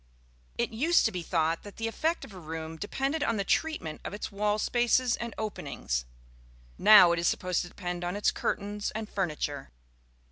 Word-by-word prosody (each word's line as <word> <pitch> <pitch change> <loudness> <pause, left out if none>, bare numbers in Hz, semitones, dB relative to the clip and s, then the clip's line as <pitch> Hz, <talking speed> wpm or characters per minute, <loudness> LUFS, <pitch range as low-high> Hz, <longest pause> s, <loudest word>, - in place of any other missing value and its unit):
It - - 0
used 310 +10 +3
to - - +2
be 180 - -4
thought 165 -1 0
that 205 - -11
the 225 - -2
effect 320 +9 -1
of 210 - -14
a 185 - -9
room 160 0 -6
depended 270 - -2
on 230 -5 +1
the 200 - 0
treatment 195 - -1
of - - -5
its 210 - -5
wall 210 +1 0
spaces 240 +2 +2
and 235 -1 -6
openings; - - -3 0.7
now 205 -5 +9
it 170 - +1
is 170 - +1
supposed 180 -2 0
to 175 - -6
depend 175 -1 -5
on 175 +2 -2
its 205 - +2
curtains 205 +1 -2
and 220 -1 -3
furniture. 150 -8 -3
200 Hz, 185 wpm, -29 LUFS, 170-225 Hz, 0.7 s, now